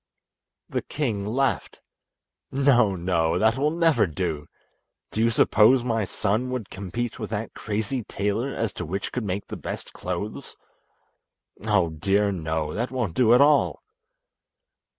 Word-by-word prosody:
The - - -2
king 110 -9 -2
laughed. 135 +5 -1 0.7
"No, 125 -7 +3
no, 85 -2 +1
that 110 +4 +3
will 140 +3 +1
never 165 - +3
do. 80 -3 -3 0.6
Do 110 - -1
you 115 - +4
suppose 115 +2 +4
my 115 -3 0
son 110 +6 -1
would 125 -6 -4
compete 100 +5 -4
with - - -4
that 110 0 -4
crazy 110 +4 -3
tailor 105 +6 -1
as 115 -5 -2
to - - -5
which 95 +4 -3
could 125 - -3
make 100 0 -3
the - - -7
best - - -6
clothes? 90 +4 -5 1.1
Oh, 95 -6 +3
dear, 100 +6 +1
no, 80 -4 -2
that 120 +3 -2
won't 120 -9 -2
do 120 +3 +5
at 125 - +5
all." 145 0 +3
110 Hz, 145 wpm, -25 LUFS, 95-125 Hz, 1.1 s, do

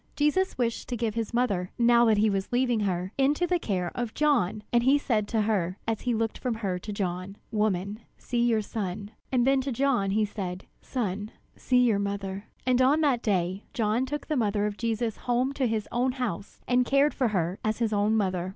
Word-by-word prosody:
Jesus 300 +6 +1
wished 235 -2 -1
to 245 - -2
give 225 -2 -1
his 230 -1 -3
mother, 205 -7 0
now 235 0 +5
that 220 -2 +4
he 215 +1 +4
was 195 -2 -1
leaving 245 -2 +2
her, 185 -1 -1
into 290 +6 +3
the 350 0 +1
care 180 - -2
of 240 -2 -4
John, 245 -9 +1
and 240 - +5
he 265 +4 +4
said 220 -7 0
to 225 -1 0
her, 195 -4 0
as 225 -1 -1
he 245 -2 0
looked 225 0 -2
from 250 -3 -2
her 195 -5 -2
to 210 - -7
John: 185 -1 -3 0.2
"Woman, 210 -1 0 0.2
see 240 -1 -2
your 225 -3 +2
son." 200 -1 -4 0.2
And 250 -2 +3
then 270 0 +3
to 270 +1 -3
John 245 -5 +1
he 215 +2 +2
said: 190 -3 -5 0.2
"Son, 210 -4 -3 0.3
see 250 -1 +2
your 225 -5 +3
mother." 200 0 -3 0.2
And 255 0 +3
on 280 +5 +4
that 270 -6 +2
day 190 -2 -1
John 225 +3 +1
took 295 +2 -4
the 310 - -1
mother 210 -4 +1
of 210 -1 -2
Jesus 225 0 -2
home 250 +2 0
to 270 -3 0
his 220 -2 -2
own 250 +1 +1
house, 235 -7 -4
and 250 0 +3
cared 275 +4 +3
for 255 - +1
her 185 -3 -1
as 215 0 0
his 225 -2 0
own 210 +2 +2
mother. 185 -3 0
220 Hz, 215 wpm, -27 LUFS, 200-250 Hz, 0.3 s, now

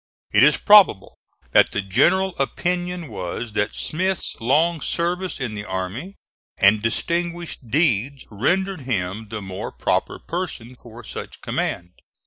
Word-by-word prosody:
It - - +4
is - - +6
probable 205 - +5 0.3
that - - +5
the 105 - 0
general 175 - +2
opinion 175 +4 -2
was 105 +2 -5
that 105 0 -1
Smith's 185 +3 -1
long 155 +7 +2
services 175 +3 -1
in 125 -5 -3
the 105 -1 -5
army 100 - -5 0.4
and 105 +2 +5
distinguished 170 +3 -2
deeds 135 -2 +1
rendered 185 - 0
him 105 -4 -3
the 105 -2 -5
more 95 -1 -6
proper - - -1
person 150 -9 -5
for 120 -1 -13
such - - -8
command. 90 0 -3
130 Hz, 130 wpm, -22 LUFS, 105-175 Hz, 0.4 s, is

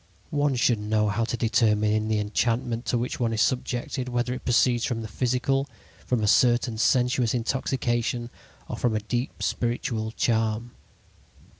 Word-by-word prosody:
One 145 -2 +1
should 120 -2 +2
know 105 0 +1
how 115 +3 0
to 120 - -3
determine 110 -2 +2
in 110 0 0
the 110 -1 +1
enchantment 115 +3 -1
to 120 - +1
which 120 +2 -3
one 115 -2 0
is 110 - 0
subjected 125 0 -2
whether 125 0 -1
it 130 - -7
proceeds 120 -1 +3
from 115 -3 -2
the - - -5
physical, 130 +4 0 0.4
from 120 -4 +1
a - - +2
certain 120 0 +3
sensuous 125 0 +2
intoxication, 120 -1 -1 0.4
or - - -5
from 120 -3 0
a - - +1
deep 120 +4 -3
spiritual 120 -2 -1
charm. 115 0 0
120 Hz, 160 wpm, -26 LUFS, 110-125 Hz, 0.4 s, proceeds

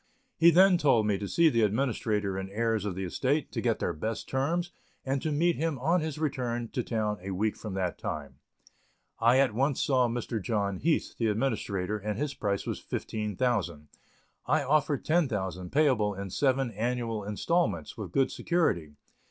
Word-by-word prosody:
He 165 +1 +6
then 180 +1 +6
told 120 -8 +4
me 100 -2 +1
to 100 - -4
see 170 - +4
the 115 -5 +1
administrator 105 -3 0
and 95 0 -4
heirs 110 0 0
of 100 -4 -3
the 95 - -3
estate, 135 - -1
to - - -3
get - - +1
their - - -1
best 110 +9 -4
terms, 165 +7 -1 0.3
and 135 0 -1
to 155 - -1
meet 165 +3 +2
him 160 -1 -1
on 165 +8 +2
his 155 -2 -3
return 125 -6 -2
to 125 - -2
town 110 -3 -2
a 95 - -6
week 105 +3 0
from 105 -4 -7
that 90 -2 -2
time. 75 -3 -5 0.8
I 120 +3 +5
at 135 -4 +3
once 135 +4 +1
saw 130 -3 +3
Mr. 115 -1 -3
John 100 -2 -1
Heath, 160 - 0
the 115 - +2
administrator, 105 -4 -1
and 105 0 -3
his 145 +2 -2
price 100 -6 -2
was - - -4
$15,000. 105 - -2 0.6
I 150 +2 +2
offered 145 0 +1
$10,000, 100 - 0
payable 130 -9 +2
in 100 -1 -6
seven 135 -1 +1
annual 115 0 -2
instalments, 165 - -1
with 105 -7 -6
good 135 +6 +2
security. 95 - 0
115 Hz, 175 wpm, -29 LUFS, 100-140 Hz, 0.8 s, He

